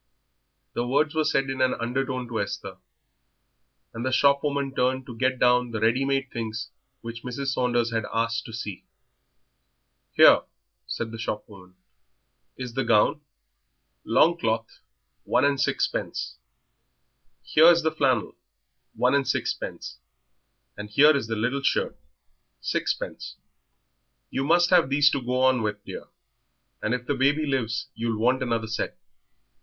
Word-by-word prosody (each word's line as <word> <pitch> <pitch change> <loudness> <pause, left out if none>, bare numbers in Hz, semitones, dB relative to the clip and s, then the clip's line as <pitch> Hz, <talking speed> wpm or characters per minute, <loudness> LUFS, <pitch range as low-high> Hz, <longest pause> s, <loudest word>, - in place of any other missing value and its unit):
'" - - -50
The 120 - -2
words 145 +4 +1
were 160 -1 +1
said 135 -2 +1
in 130 0 -4
an 130 0 +2
undertone 130 +1 -2
to 115 -3 -1
Esther, 100 - -5 1.2
and 115 - -5
the 130 - -1
shop 140 +1 +3
woman 140 -2 -1
turned 130 0 0
to 120 - -9
get 130 +2 0
down 125 0 +3
the 110 -2 -4
ready 115 +5 +2
made 135 -1 -1
things 115 -1 -5 0.3
which 115 0 -7
Mrs. 130 +2 -4
Saunders 120 -2 0
had 115 -2 -1
asked 115 +1 -1
to - - -9
see. 105 -5 -6 1.3
"Here," - - +7 0.5
said 115 - -4
the 115 - -8
shopwoman, 100 -4 -7 0.8
"is 125 -2 -6
the 135 +2 -1
gown, 115 +6 +3 0.8
longcloth, 115 -10 +1 0.4
one 125 +3 +2
and 140 -2 +1
sixpence; 65 - -2 1.0
here 160 +2 +5
is 170 -1 +6
the 160 - +1
flannel, 130 -7 +1 0.6
one 125 +1 +2
and 140 -2 +2
sixpence; - - -3 0.8
and 105 0 -8
here 145 +8 +6
is 135 -5 -2
the 115 - -2
little 120 +6 -1
shirt, - - 0 0.6
sixpence." - - -3 1.0
"You 135 - -1
must 175 +3 +3
have 175 -6 +5
these 145 +1 +4
to 140 - -1
go 125 +1 -1
on 130 -2 +4
with, 105 -1 -3
dear, - - -8 0.7
and 115 - 0
if 125 0 -6
the 145 - 0
baby 140 +3 +2
lives 125 -5 -2
you'll 115 -1 -2
want 125 +4 +2
another 115 -3 -1
set." 110 +1 -4
125 Hz, 145 wpm, -25 LUFS, 115-140 Hz, 1.3 s, Here